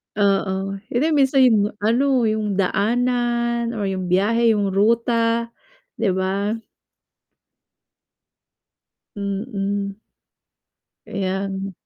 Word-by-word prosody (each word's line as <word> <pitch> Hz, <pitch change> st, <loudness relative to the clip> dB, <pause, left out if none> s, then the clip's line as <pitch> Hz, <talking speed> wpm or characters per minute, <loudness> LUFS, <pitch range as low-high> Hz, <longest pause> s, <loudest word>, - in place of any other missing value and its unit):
Oo, 195 Hz, -1 st, 0 dB
hindi 245 Hz, +5 st, 0 dB
minsan 270 Hz, -2 st, +4 dB
'yon 210 Hz, -4 st, +3 dB
ano, 255 Hz, +3 st, +2 dB
'yong 215 Hz, -2 st, 0 dB
daanan 235 Hz, +3 st, 0 dB
or 210 Hz, -, -3 dB
'yong 185 Hz, -1 st, -3 dB
biyahe, 220 Hz, +5 st, +3 dB
'yong 200 Hz, -2 st, 0 dB
ruta, 230 Hz, +2 st, +1 dB, 0.5 s
'di 220 Hz, -4 st, 0 dB
ba? 200 Hz, +4 st, -1 dB, 2.6 s
Mm. 200 Hz, -1 st, -3 dB, 1.1 s
Kaya 195 Hz, 0 st, -2 dB
ng 195 Hz, 0 st, -4 dB
210 Hz, 85 wpm, -21 LUFS, 195-235 Hz, 2.6 s, minsan